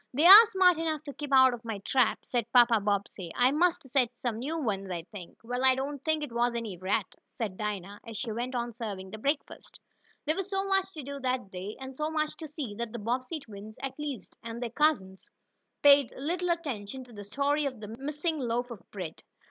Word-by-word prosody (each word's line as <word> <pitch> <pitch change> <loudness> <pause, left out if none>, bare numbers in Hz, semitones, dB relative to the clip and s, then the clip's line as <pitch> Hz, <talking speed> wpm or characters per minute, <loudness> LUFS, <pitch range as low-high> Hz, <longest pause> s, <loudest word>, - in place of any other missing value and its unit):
"They 300 +5 +3
are 405 +5 +12
smart 370 -5 +4
enough 315 -2 -2
to 285 - -7
keep 290 0 -7
out 260 -1 +7
of 240 -1 -7
my 225 -2 -4
trap," 240 +4 +1
said 235 -2 -2
Papa 240 -2 +6
Bobbsey. 200 -3 -2
"I 250 +1 +4
must 345 +4 +2
set 255 -3 0
some 230 -3 -3
new 300 +7 -3
ones, 195 -8 -2
I 175 -2 -4
think." 180 0 -11
"Well, 245 +2 -3
I 260 -1 +6
don't 275 +1 -4
think 315 -1 +1
it 295 - -5
was 235 +1 +1
any 225 -5 -3
rat," 190 +3 -1 0.2
said 210 -5 -3
Dinah, 205 -1 -4
as 230 -3 -8
she 230 - -3
went 245 +4 -3
on 240 -1 -2
serving 200 -5 -6
breakfast. 275 +7 -3 0.5
There 310 +1 +1
was 390 +1 -4
so 390 0 -1
much 385 -1 +1
to 305 - -7
do 280 +1 -6
that 255 -6 -2
day, 190 +3 -6
and 265 0 -8
so 305 +3 -2
much 310 -1 -1
to 320 - -7
see, 290 -7 -5
that 235 -1 -4
the - - -4
Bobbsey 255 +8 -2
twins, 215 -3 -11
at 270 +2 -5
least, 280 -9 -5
and 230 0 -6
their 240 -2 -4
cousins, 235 -10 0 0.5
paid 280 -3 +7
little 350 +6 -2
attention 265 -8 -3
to 245 -1 -16
the 205 -1 -8
story 285 +7 0
of 255 -4 -6
the 210 -1 -8
missing 300 +3 -2
loaf 245 -1 -2
of 220 -6 -8
bread. 180 -6 -7
250 Hz, 220 wpm, -29 LUFS, 215-295 Hz, 0.5 s, are